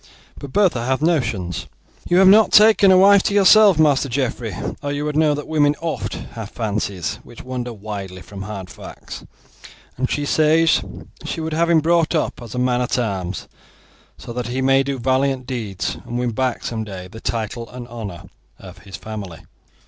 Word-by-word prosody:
But 140 - -9
Bertha 180 - +2
hath 130 +4 -1
notions. 110 - -1 0.4
You 175 - +3
have 190 0 +6
not 210 +3 +6
taken 210 -2 +6
a 185 - +6
wife 200 +1 +6
to 200 - -1
yourself, 205 -2 +6
Master 145 -3 +3
Geoffrey, 120 -5 -2 0.3
or 145 -1 -3
you 145 +1 -3
would 150 -1 -3
know 155 -1 +3
that 150 - -6
women 150 -2 +2
oft 160 -6 -4 0.2
have 110 -3 -7
fancies 100 -6 -3
which 120 - -13
wander 125 -1 -5
widely 100 -4 -7
from 100 +2 -10
hard 95 -2 -7
facts, - - -10 0.7
and 130 +1 -1
she 145 - -1
says 160 +2 +3 0.4
she - - -4
would 160 0 -3
have 170 +2 +1
him 165 -2 +4
brought 170 +1 +2
up 155 - -2
as 115 -2 -9
a - - -4
man 125 0 +1
at 125 +1 -1
arms, 95 -6 -3 0.7
so 120 - -9
that 125 -1 -4
he 125 +2 -3
may 135 +1 +3
do 135 0 -3
valiant 130 +1 0
deeds, 115 -7 -4
and 120 - -5
win 125 -1 -1
back 125 +2 -2
some 110 -2 -3
day 95 -3 -8
the 110 +5 -12
title 115 +1 -4
and 125 -1 -9
honour 110 -8 -8 0.3
of - - -13
his 95 -3 -11
family." 100 -6 -8
125 Hz, 185 wpm, -20 LUFS, 110-155 Hz, 0.7 s, have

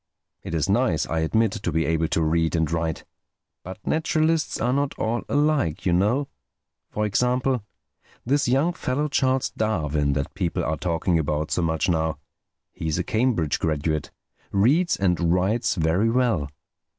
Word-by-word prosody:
"It 85 - -5
is 80 - 0
nice, - - +2
I 80 - -2
admit, 110 +7 +2
to 110 -5 -3
be 80 +1 +1
able 80 0 +1
to 80 - 0
read 80 +1 +1
and 80 -1 0
write. 80 -1 -2 0.6
But 95 +3 -8
naturalists 160 0 +1
are 120 +3 +1
not 140 0 -1
all 115 +2 -1
alike, 145 - +1
you 90 - +2
know. 110 +10 +2 0.6
For 105 - -1
example: 125 +3 +1 0.6
this 140 +3 +1
young 140 +8 +2
fellow 145 -3 -1
Charles 130 -1 +1
Darwin 75 -9 0
that 70 +2 -3
people 90 -4 -2
are 80 - -1
talking 85 +1 0
about 75 0 -2
so - - +1
much 80 -1 0
now—he's 80 -1 -4
a - - 0
Cambridge 110 - 0
graduate—reads 85 - 0
and 90 -3 +1
writes 100 +7 +1
very 85 +6 +2
well. 115 - +1
95 Hz, 150 wpm, -24 LUFS, 80-125 Hz, 0.6 s, nice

